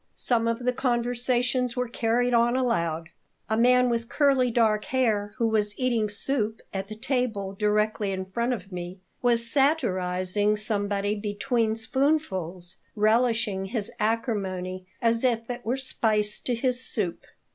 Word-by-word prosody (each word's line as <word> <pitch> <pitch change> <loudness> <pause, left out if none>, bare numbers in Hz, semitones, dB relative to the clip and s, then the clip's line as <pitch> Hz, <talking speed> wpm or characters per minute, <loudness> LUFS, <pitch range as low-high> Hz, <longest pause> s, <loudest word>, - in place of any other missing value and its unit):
Some 230 -2 +2
of 230 +2 -2
the 250 - +2
conversations 245 0 0
were 250 0 0
carried 240 +1 0
on 235 +1 +3
aloud. 170 -11 0 0.4
A - - +3
man 250 +2 +4
with 235 -1 -1
curly 275 -4 +3
dark 220 -3 +2
hair 215 -5 0
who 230 -2 +2
was 210 -2 0
eating 235 -4 +1
soup 220 0 -1
at 195 0 -3
the 215 - -7
table 220 -5 -2
directly 210 0 0
in 190 -1 -3
front 235 +6 -1
of 200 -5 -5
me 180 +1 -6 0.2
was 235 -1 +2
satirizing 205 - +1
somebody 205 -1 -1
between 215 +2 -1
spoonfuls, 225 - -1 0.2
relishing 220 -2 +2
his 205 0 -3
acrimony 190 -5 -2 0.2
as 230 +1 +2
if 230 -3 +1
it 245 0 -6
were 240 +5 -1
spice 215 -5 0
to 245 - -2
his 250 +1 -1
soup. 200 -9 -3
225 Hz, 145 wpm, -26 LUFS, 205-245 Hz, 0.4 s, man